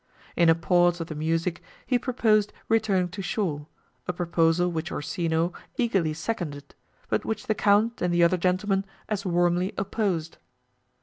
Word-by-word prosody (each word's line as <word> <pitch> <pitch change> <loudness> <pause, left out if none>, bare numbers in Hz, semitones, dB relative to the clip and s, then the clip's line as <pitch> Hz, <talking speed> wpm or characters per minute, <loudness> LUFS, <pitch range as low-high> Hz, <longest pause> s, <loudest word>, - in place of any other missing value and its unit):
In 170 -1 +4
a 165 - +6
pause 175 +1 +2
of 165 - -3
the - - -4
music, 165 +3 -1 0.2
he 250 -2 +2
proposed 220 -5 +2 0.2
returning 200 -5 +2
to 195 +3 -6
shore, 165 -7 -2 0.4
a 180 - -1
proposal 170 0 +1
which 165 +2 -3
Orsino 165 +1 -1 0.2
eagerly 190 -10 +1
seconded, 155 -6 -4 0.3
but - - 0
which 220 - -3
the 215 - +1
Count 210 +3 +2
and 180 - +1
the 175 0 +3
other 170 +2 +4
gentlemen 190 +2 +1 0.3
as 205 -2 -2
warmly 175 +1 +1
opposed. 195 -5 -2
180 Hz, 150 wpm, -26 LUFS, 165-205 Hz, 0.4 s, a